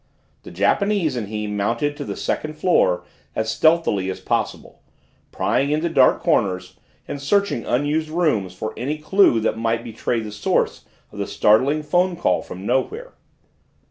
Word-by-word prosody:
The - - -11
Japanese 200 -8 +1
and 115 -4 -3
he 105 0 -4
mounted 115 +8 -1
to - - -4
the - - -5
second 155 0 -2
floor 120 - +2 0.3
as 110 0 -1
stealthily 155 - +2
as 95 - -4
possible, - - -3 0.5
prying 140 - 0
into 155 +3 0
dark 135 -5 +4
corners 95 -2 0 0.3
and 140 - -5
searching 200 - 0
unused 150 +5 0
rooms 145 - 0
for 110 +3 -5
any 145 +5 -3
clue 155 - +3
that 110 0 -1
might 115 0 0
betray 115 +1 -2
the 110 -1 -6
source 105 0 -1 0.3
of - - -10
the - - -2
startling 135 +9 +3
phone 175 +4 +1
call 175 - +1
from 95 +2 -9
nowhere. 280 - -1
130 Hz, 155 wpm, -21 LUFS, 105-155 Hz, 0.5 s, dark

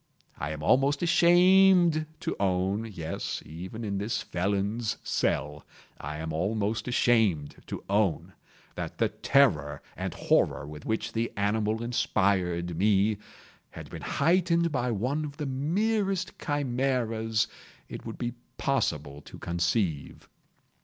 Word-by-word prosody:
I 70 - -3
am 75 -1 -5
almost 140 - +3
ashamed 175 -1 +5
to - - -2
own—yes, 95 -2 -2
even 90 +8 -7
in 100 -2 -2
this 105 +3 -2
felon's 100 +5 -1
cell, 75 +1 -1 0.4
I 75 +2 -5
am 80 0 -4
almost 105 +7 -1
ashamed 110 -11 +2
to - - -6
own—that 100 -3 -3
the - - +2
terror 75 0 +2 0.2
and - - -4
horror - - +2
with 75 0 -9
which 110 0 -2
the 115 +1 -1
animal 105 +2 0
inspired 90 -7 0
me, 105 +1 +3 0.5
had - - -10
been - - -7
heightened 170 +1 +2
by 125 -3 0
one 125 +8 -1
of 145 -1 -7
the 150 - -3
merest 190 +7 0
chimaeras 125 -6 0 0.4
it - - -8
would 115 - -7
be 120 -1 -3 0.2
possible 75 - -1
to - - -12
conceive. 85 -2 -1
110 Hz, 120 wpm, -28 LUFS, 90-140 Hz, 0.5 s, ashamed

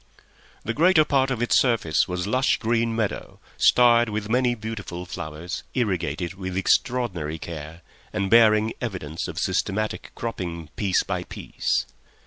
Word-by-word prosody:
The 115 - -1
greater 160 +2 +5
part 135 -2 +2
of 125 -3 -1
its 120 - +4
surface 115 - +2
was 90 0 -3
lush 130 +6 +2
green 115 0 0
meadow, 110 -3 -3 0.2
starred 120 -1 +5
with 105 0 -4
many 125 0 +2
beautiful 105 -5 -6
flowers, 85 +1 -6
irrigated 90 - -1
with 95 -1 -5
extraordinary 95 -7 0
care, 80 0 -8 0.3
and 100 - -1
bearing 110 0 +5
evidence 90 -9 -4
of 80 - -7
systematic 100 +5 -1
cropping 85 -8 -5
piece 100 -3 +1
by - - -3
piece. - - -2
105 Hz, 135 wpm, -24 LUFS, 85-120 Hz, 0.3 s, greater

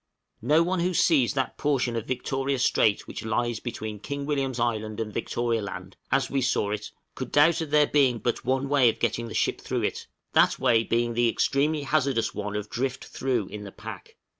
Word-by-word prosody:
No 155 +3 +4
one 180 +1 -1
who 180 +1 0
sees 140 -9 +3
that 130 -3 -2
portion 130 -5 +1
of 115 -1 -3
Victoria 135 +1 -1
Strait 110 -4 +2
which - - -7
lies 115 +1 -1
between 110 -3 -5
King 140 +6 -5
William's 135 -4 -1
Island 110 -2 -1
and 110 -2 -3
Victoria 115 0 -1
Land, 95 -2 -7 0.2
as 135 +1 +2
we 135 - -1
saw 105 -4 +1
it, 105 0 -4 0.2
could 130 -2 -6
doubt 155 +3 +4
of 160 - -4
there 150 0 +5
being 135 -5 +3
but 120 +1 -2
one 130 +2 0
way 135 -4 +5
of - - -3
getting 115 0 -1
a - - -7
ship - - 0
through - - -2
it, - - -3 0.3
that - - +4
way 120 -4 +3
being 120 +1 0
the 120 0 +3
extremely 145 +5 +1
hazardous 140 -5 +1
one 105 0 -4
of 105 0 -3
drift 130 +4 -3
through 125 -5 -1
in 105 -1 -7
the 100 - -8
pack. - - -10
125 Hz, 205 wpm, -26 LUFS, 115-140 Hz, 0.3 s, there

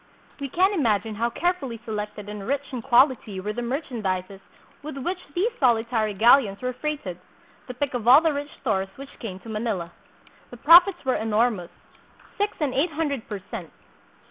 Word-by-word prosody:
We 280 -1 -4
can 375 +8 +2
imagine 225 - +1
how 230 +3 0
carefully 275 -5 -2
selected 210 -1 -5
and 210 -1 -7
rich 280 +1 -2
in 250 - -3
quality 240 -5 +3
were 210 +3 -3
the 240 - -4
merchandises 210 - -3 0.4
with 295 -1 -7
which 350 +7 -3 0.2
these 405 +7 +1
solitary 225 -4 +2
galleons 225 -1 +5
were 255 0 -3
freighted, 255 - -4 0.5
the 250 - -7
pick 280 +1 -2
of 240 -2 -3
all 255 +4 +9
the 320 -1 +1
rich 285 +1 -4
stores 195 -6 0
which 275 +1 -12
came 195 -5 -6
to 230 - -11
Manila. 215 -6 -3 0.6
The 245 - -11
profits 345 +5 +6
were 260 - +2
enormous, 220 -4 0 0.7
six 410 +1 0
and 290 -5 0
eight 310 +5 +1
hundred 290 -6 -2
per 200 -3 -5
cent. 185 -9 -6
240 Hz, 170 wpm, -25 LUFS, 210-285 Hz, 0.7 s, all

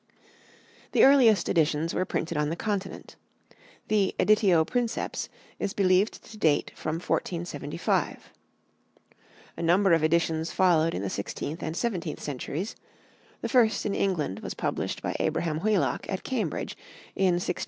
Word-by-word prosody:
The - - +5
earliest 245 -8 +6
editions 160 0 +1
were 185 - 0
printed 165 -1 -3
on 150 0 0
the 165 - -2
Continent; 200 0 -4 0.7
the 205 -3 +1
"editio 195 -7 +4
princeps" 240 +2 -2 0.3
is 200 - -2
believed 190 +1 +2
to 215 - -12
date 155 -6 +2
from 155 - -3
1475. 170 -3 -2 1.3
A - - -5
number 180 +3 +4
of 165 -2 +3
editions 160 0 +1
followed 165 -3 +3
in 95 - -3
the 100 - -2
sixteenth 145 +10 -4
and 160 +2 -4
seventeenth 180 -10 -2
centuries; 150 - -4 0.7
the - - -2
first 235 -4 +3
in 205 - 0
England 165 - -1
was - - -6
published - - -3
by - - -2
Abraham 155 -2 0
Whelock 210 +1 0
at 190 - -3
Cambridge 220 - -3 0.4
in 185 -2 +3
1643 175 0 -1
4. - - -17
175 Hz, 145 wpm, -27 LUFS, 160-205 Hz, 1.3 s, earliest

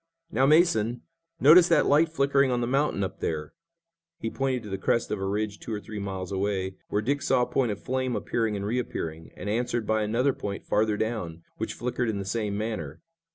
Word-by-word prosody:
Now, 135 -3 +3
Mason, 125 -8 +3 0.4
notice 165 +5 +8
that - - +4
light 155 +3 +4
flickering 140 -3 +2
on 125 -1 +1
the 120 - 0
mountain 135 -4 +1
up 95 - -4
there!" 75 -2 -3 0.6
He 115 - -4
pointed 130 -3 -1
to 105 - -8
the 95 -1 -3
crest 115 +4 0
of 105 - -1
a 95 - -1
ridge 105 +1 -2
two - - -7
or 105 - -2
three 105 0 -7
miles 95 -2 -4
away, 95 -1 -1
where 105 - 0
Dick 140 +5 0
saw 130 -1 +3
a - - +1
point 125 -3 0
of 100 - -5
flame 130 -1 -1
appearing 115 -3 -1
and 100 0 -3
reappearing, 85 -8 -3
and 90 - -6
answered 120 +1 -1
by 110 0 +1
another 120 +6 +1
point 100 -4 -5
farther 105 0 +1
down, 90 -8 -3
which - - -3
flickered 120 0 -2
in 105 - -1
the 100 - -4
same 105 0 -2
manner. 110 +7 -4
110 Hz, 210 wpm, -27 LUFS, 100-130 Hz, 0.6 s, notice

